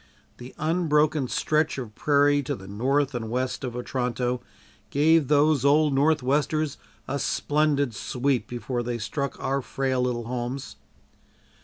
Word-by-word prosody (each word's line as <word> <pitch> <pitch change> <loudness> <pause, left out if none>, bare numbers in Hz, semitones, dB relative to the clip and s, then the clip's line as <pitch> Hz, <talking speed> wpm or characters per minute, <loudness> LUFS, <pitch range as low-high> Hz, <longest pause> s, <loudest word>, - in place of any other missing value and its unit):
The 125 +1 -10
unbroken 155 -3 +1
stretch 155 +4 0
of 120 -5 -6
prairie 145 +2 +3
to 130 - -3
the 95 -1 -11
north 135 +7 0
and 115 -3 -4
west 130 +3 -2
of 125 -2 -4
Otranto 125 0 -2 0.5
gave 155 +1 +3
those 150 -1 +3
old 145 +1 +4
"northwesters" 145 +1 +1 0.3
a 140 +1 -2
splendid 145 -4 +1
sweep 130 +3 -1
before 120 +1 -3
they 120 0 -3
struck 125 +6 -4
our 135 +1 -1
frail 130 0 -1
little 125 -1 -1
homes. 125 +2 -4
135 Hz, 135 wpm, -25 LUFS, 125-150 Hz, 0.5 s, old